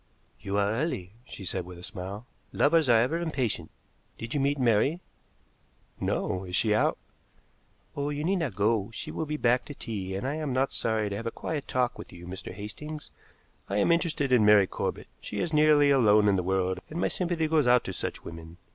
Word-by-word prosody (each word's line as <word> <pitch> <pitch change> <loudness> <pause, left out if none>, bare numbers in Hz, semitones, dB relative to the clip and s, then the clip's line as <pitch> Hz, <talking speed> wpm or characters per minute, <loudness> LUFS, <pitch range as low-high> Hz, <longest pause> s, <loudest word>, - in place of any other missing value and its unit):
"You 100 +1 -3
are 100 0 +2
early," 110 - -2
she 100 - -9
said 90 +1 -2
with 90 0 -10
a 85 - -12
smile. 95 +5 -6 0.3
"Lovers 155 -1 +3
are 115 -2 +6
ever 135 +9 +1
impatient. 140 -9 -1 0.5
Did 115 0 -6
you 145 - +1
meet 140 +1 +1
Mary?" 125 +6 +2 1.0
"No. 95 0 -1
Is 90 -1 -4
she 105 +2 +2
out?" 105 - +2 1.0
"Oh, 145 0 -1
you 145 0 -3
need 190 +4 +1
not 150 - -2
go. 105 0 +1
She - - -6
will 160 - -3
be 150 +1 -2
back 125 -2 +2
to 145 - -8
tea, 100 -8 -5
and 100 - -3
I 145 +3 -2
am 150 -4 -2
not 130 +2 +1
sorry 110 -2 0
to - - -2
have 115 +3 -4
a - - +1
quiet 145 +4 -4
talk 125 -1 0
with - - -9
you, 85 0 -11
Mr. 95 +1 -7
Hastings. 150 +10 -8 0.6
I 100 - 0
am 105 - +3
interested 165 -5 +1
in 125 -4 +5
Mary 105 -1 +7
Corbett. - - -4
She - - -5
is 165 - -2
nearly 150 -1 +5
alone 105 -6 +5
in 100 - +4
the 95 - +1
world, 95 0 0
and 160 - -5
my - - +2
sympathy 170 -3 -1
goes 155 -4 +2
out 125 -1 +5
to 95 - -5
such - - -4
women. 80 0 -9
115 Hz, 210 wpm, -28 LUFS, 100-150 Hz, 1.0 s, Mary